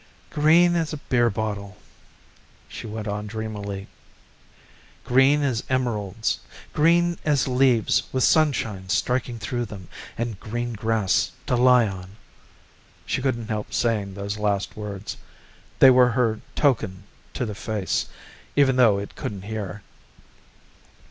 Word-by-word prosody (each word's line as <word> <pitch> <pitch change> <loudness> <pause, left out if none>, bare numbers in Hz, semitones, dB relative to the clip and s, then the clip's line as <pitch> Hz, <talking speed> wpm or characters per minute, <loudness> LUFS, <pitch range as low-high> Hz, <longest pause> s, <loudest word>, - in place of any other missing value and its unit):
"Green 170 +4 +4
as 165 -2 -1
a - - -3
beer 120 -4 +1
bottle," 100 -2 -4 0.9
she - - -8
went 110 0 -5
on 105 +1 -3
dreamily, 105 -2 -5 1.2
"green 135 +4 +4
as 125 -5 0
emeralds, 110 -5 -1 0.3
green 170 +2 +3
as 145 -4 +2
leaves 125 -7 +3
with 130 -1 0
sunshine 110 -12 +2
striking 125 +3 0
through 120 +2 -3
them 95 -4 -10 0.3
and 115 -4 -3
green 120 +2 -4
grass 110 -3 0
to - - +1
lie 125 -1 +5
on." 95 0 -8 0.9
She - - -1
couldn't 120 -4 -2
help 105 -1 -4
saying 105 -5 0
those 100 +1 -4
last 100 -1 -1
words. 105 -2 -6 0.6
They 135 - +8
were 125 -1 +6
her 115 -3 +1
token 110 -10 +1 0.3
to 125 - -1
the 105 - -4
face, 105 -1 -2 0.5
even 135 -2 +4
though 115 -6 +5
it 100 0 -6
couldn't 100 -3 -5
hear. 105 -1 -5
110 Hz, 130 wpm, -24 LUFS, 105-130 Hz, 1.2 s, They